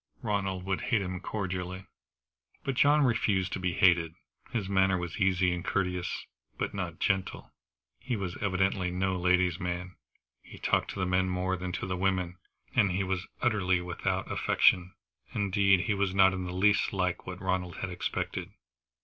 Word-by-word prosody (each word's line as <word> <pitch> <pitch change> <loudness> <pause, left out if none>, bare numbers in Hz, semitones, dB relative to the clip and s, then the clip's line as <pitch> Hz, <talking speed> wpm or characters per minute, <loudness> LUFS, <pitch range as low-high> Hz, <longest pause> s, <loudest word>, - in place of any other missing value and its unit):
Ronald 95 -4 -1
would 95 -1 -1
hate 110 -6 +1
him 90 -1 -4
cordially. 95 -2 -4 0.8
But 135 - -1
John 145 +3 +4
refused 105 -7 +1
to - - -2
be 90 -1 -1
hated. 85 -2 +3 0.3
His 110 -6 -2
manner 95 -1 +3
was 90 +2 -5
easy 95 -2 +3
and 85 -1 -4
courteous, 90 -2 -2 0.3
but - - -2
not - - -4
gentle. 95 -1 -1 0.5
He 125 +1 -2
was 95 -4 -4
evidently 95 -1 +1
no 95 +1 0
lady's 90 -1 +2
man. 90 0 -4 0.5
He - - -13
talked - - +1
to - - -5
the 95 - +1
men 95 0 +1
more 90 +1 0
than 90 0 -4
to - - -3
the 90 0 -2
women, 95 -1 0 0.4
and 100 - +4
he 95 +2 0
was 95 -1 -2 0.2
utterly 95 -7 +2
without 90 0 -2
affectation. 90 0 +3 0.4
Indeed, 100 -2 +3
he 105 - 0
was 100 -2 0
not 95 -1 +6
in 95 -1 -3
the 90 - -4
least 105 +4 +2
like 90 -2 -1
what 90 0 -6
Ronald 95 -2 -2
had 95 - -4
expected. 90 - -3
95 Hz, 170 wpm, -29 LUFS, 90-95 Hz, 0.8 s, not